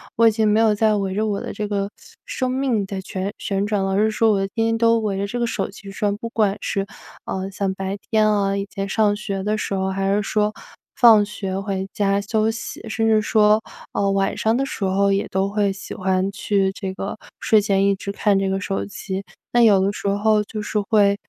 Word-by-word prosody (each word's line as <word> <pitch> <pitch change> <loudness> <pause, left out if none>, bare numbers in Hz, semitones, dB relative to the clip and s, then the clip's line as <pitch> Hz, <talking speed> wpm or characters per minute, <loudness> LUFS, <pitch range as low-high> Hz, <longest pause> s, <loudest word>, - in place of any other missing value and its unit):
我 230 - +4
已 - - +6
经 220 0 +1
没 210 +1 +3
有 220 -2 +4
再 215 0 +2
围 195 -2 -1
着 215 +2 0
我 200 -2 -1
的 - - -5
这 210 - -4
个 200 -1 -1 0.4
生 255 - -2
命 255 -5 0
在 195 0 -5
旋 190 +1 -4
旋 195 0 -1
转 205 -2 0
了。 195 - -1
而 210 +3 +3
是 220 - +1
说 220 +1 +3
我 200 - +2
天 225 +3 -1
天 225 0 +1
都 230 0 +4
围 210 -3 -2
着 200 +1 -2
这 240 +5 -4
个 240 - +1
手 230 - -2
机 195 0 -11
转， 205 +1 -1
不 230 +2 -6
管 210 -3 +1
是， 195 -1 -1 0.4
呃， 190 0 -3
像 195 0 -2
白 195 +1 -4
天 215 -1 +3
啊， 200 -1 +1
以 200 0 -2
前 195 -1 -3
上 210 0 +2
学 200 -2 -4
的 210 +2 0
时 215 - -3
候， 190 0 0
还 195 +1 0
是 210 - +1
说 210 +1 0 0.4
放 225 -4 +7
学 195 -2 -4
回 195 -1 -3
家 200 -2 +1
休 215 +2 0
息， 225 +1 -5
甚 225 0 0
至 220 -1 +4
说， 215 0 +4 0.3
呃， 200 - 0
晚 195 0 0
上 220 +1 +1
的 270 +2 0
时 210 - -4
候， 195 +1 +2
也 195 +1 0
都 190 +1 0
会 205 -1 +1
喜 195 - -8
欢 190 +1 0
去 200 -1 0
这 190 -1 -5
个 195 +2 -5 0.2
睡 220 - +4
前 195 -1 +2
一 200 - +4
直 200 - -7
看 200 -1 +2
这 195 0 0
个 190 0 -1
手 195 +1 -2
机。 195 -1 -5 0.3
那 240 - +6
有 205 -4 +6
的 195 +1 +1
时 200 - -5
候 210 +1 +2
就 215 0 -5
是 210 0 -1
会， 200 -1 +3
200 Hz, 255 characters per minute, -22 LUFS, 195-215 Hz, 0.4 s, 放